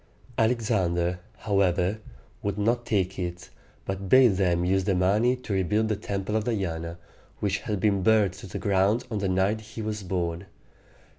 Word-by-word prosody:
Alexander, 95 -7 +1 0.2
however, 100 0 +1 0.4
would 100 0 -2
not 120 +3 0
take 95 -3 0
it, 90 -1 -5 0.3
but 95 0 -4
bade 125 -6 +6
them 90 -2 +2
use 95 +1 +1
the 100 -2 +2
money 105 +7 +3
to 125 -5 -6
rebuild 105 +4 +1
the 110 - +1
Temple 100 0 -3
of 110 -1 0
Diana, 85 -7 -2 0.4
which 100 -1 0
had 105 -4 -3
been 100 -1 +2
burned 105 -1 +4
to 95 +1 -10
the 90 - -5
ground 100 +3 +2
on 110 - -1
the 100 -1 -1
night 95 +4 +1
he 110 +1 -8
was 105 -1 -3
born. 90 -1 -3
100 Hz, 165 wpm, -26 LUFS, 90-110 Hz, 0.4 s, bade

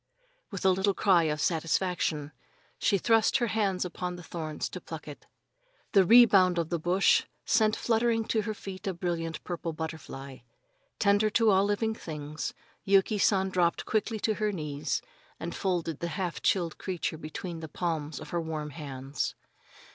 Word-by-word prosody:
With 195 -3 -5
a 190 - +7
little 190 +1 +1
cry 180 -5 +4
of 150 -1 -1
satisfaction, 165 -2 0 0.5
she 200 - +3
thrust 225 +5 +3
her 245 - +1
hands 200 -5 0
among 180 0 -4
the 175 - -10
thorns 155 -3 -4
to - - -7
pluck - - -8
it. - - -10 0.6
The 195 - +6
rebound 195 -4 +6
of 165 -2 0
the 170 - -1
bush 180 +4 +3 0.2
sent 220 -1 +3
fluttering 225 -1 +1
to 220 - +2
her 215 0 -4
feet 195 -1 -8
a 190 - -1
brilliant 170 -2 -3
purple 170 -2 -4
butterfly. 150 -4 -7 0.6
Tender 205 +1 +3
to 225 +1 +4
all 195 +1 +4
living 205 +2 0
things, 155 -6 -6 0.3
Yuki 200 +2 +3
San 190 -1 +3
dropped 175 -2 +1
quickly 220 +1 0
to 220 - +2
her 210 0 +2
knees 150 -5 -3 0.4
and 170 +1 -4
folded 175 -5 -1
the 170 - -2
half 180 -3 -3
chilled 170 -4 +1
creature 175 -4 -3
between 165 +2 -6
the 160 - -6
palms 160 -3 -3
of - - -10
her 170 - 0
warm 155 -2 -4
hands. 135 -2 -4
180 Hz, 165 wpm, -29 LUFS, 160-200 Hz, 0.6 s, a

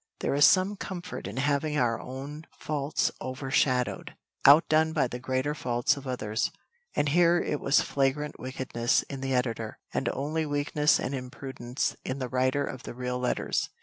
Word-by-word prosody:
There - - 0
is 145 0 +6
some 190 +5 +4
comfort 180 - -6
in 100 +5 -7
having 145 +2 +1
our 115 -4 +1
own 140 +5 -7
faults 145 -1 -1
overshadowed, 130 -1 0 0.3
outdone 155 +2 +6
by 155 - +2
the 125 0 -5
greater 130 +3 -1
faults 120 -4 +1
of 140 -1 -9
others. 115 -3 -1 0.5
And 145 - +2
here 175 +2 +4
it 150 - -1
was 140 - +3
flagrant 140 +2 -1
wickedness 130 -2 0
in 135 -2 -7
the 135 -1 0
editor, 115 -3 -2 0.2
and - - 0
only 155 +3 -2
weakness 145 +1 +2
and 130 - -3
imprudence 130 -1 -4
in 130 - -3
the 130 -2 -4
writer 130 +3 +1
of 130 - -6
the - - -8
real 125 0 -3
letters. 125 - -1
135 Hz, 165 wpm, -28 LUFS, 125-150 Hz, 0.5 s, is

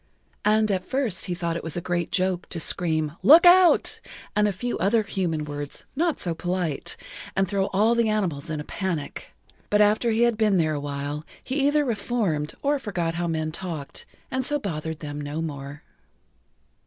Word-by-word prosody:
And 215 0 +3
at 185 -2 0
first 260 -4 -1
he 180 - -2
thought 170 -2 -2
it 165 -1 -4
a - - +1
great 175 -1 -2
joke 185 -1 0
to 170 - -4
scream 155 -1 0
"Look 325 +6 +8
out," 360 0 +6 0.4
and 210 0 +4
a - - +1
few 240 +6 -3
other 215 +3 +3
human 170 -6 -2
words 145 -1 -5
not[Pg 320 +5 +2
11] - - -24
so 170 - -1
polite, 175 -3 -2 0.4
and 195 0 +2
throw 195 0 0
all 215 +4 +3
the 235 -2 +2
animals 170 -8 -1
in 155 -1 -2
a - - -4
panic. 175 -3 -4 0.4
But 210 - +3
after 210 +3 +4
he 225 +1 +3
had 235 -2 +2
been 210 -3 +3
there 155 -2 +2
a 145 - -2
while 145 +1 -4 0.2
he 275 +1 0
either 295 0 +3
reformed 205 - -1
or 285 0 +2
forgot 180 -9 -2
how 170 +1 -2
men 160 -1 -1
talked 160 -5 -6 0.2
and 260 0 0
so 295 +3 +1
bothered 160 - -4
them 145 -1 -5
no 145 +2 -4
more. 145 -2 -6
180 Hz, 190 wpm, -25 LUFS, 155-220 Hz, 0.4 s, Look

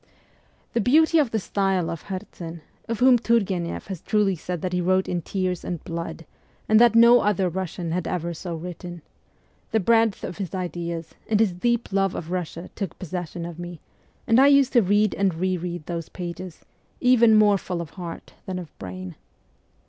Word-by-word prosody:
The 235 - +2
beauty 315 +7 +4
of 285 -5 +2
the 225 - -1
style 195 -3 0
of 165 - -7
Herzen 170 -3 -7 0.3
of 230 +1 -3
whom 255 -1 +6
Turgueneff 195 -7 0
has 190 -4 -6
truly 205 -3 +1
said 175 0 -5
that 180 -1 -2
he 180 - +1
wrote 185 +1 +2
in 175 -1 -1
tears 185 0 -2
and 175 -3 -5
blood, 165 0 -5 0.4
and 215 0 +5
that 240 -1 +6
no 235 +1 +8
other 195 -2 +1
Russian 175 -1 -4
had 175 0 -2
ever 170 -1 -2
so 170 +1 -5
written 175 0 -8 0.7
the 220 - +2
breadth 225 0 +2
of 180 - -6
his 190 -2 -4
ideas, 170 -2 -4 0.2
and 215 -1 +3
his 215 -5 +3
deep 235 +4 -1
love 195 -1 +1
of 165 +1 -6
Russia 175 -1 -4
took 195 -6 -5
possession 175 -1 -5
of 170 -1 -8
me, 175 -1 -7 0.5
and 230 +2 +4
I 275 - +7
used 280 -2 +5
to 240 - +6
read 205 +1 +2
and 190 -3 +1
re 185 +2 0
read 175 -2 -5
those 170 -2 -5
pages, 180 -1 -7 0.4
even 235 -3 +5
more 205 -2 +5
full 180 -1 -4
of 170 -3 -6
heart 170 -3 -8
than 185 -1 -3
of 175 -4 -8
brain. 90 -1 -7
185 Hz, 185 wpm, -24 LUFS, 170-215 Hz, 0.7 s, no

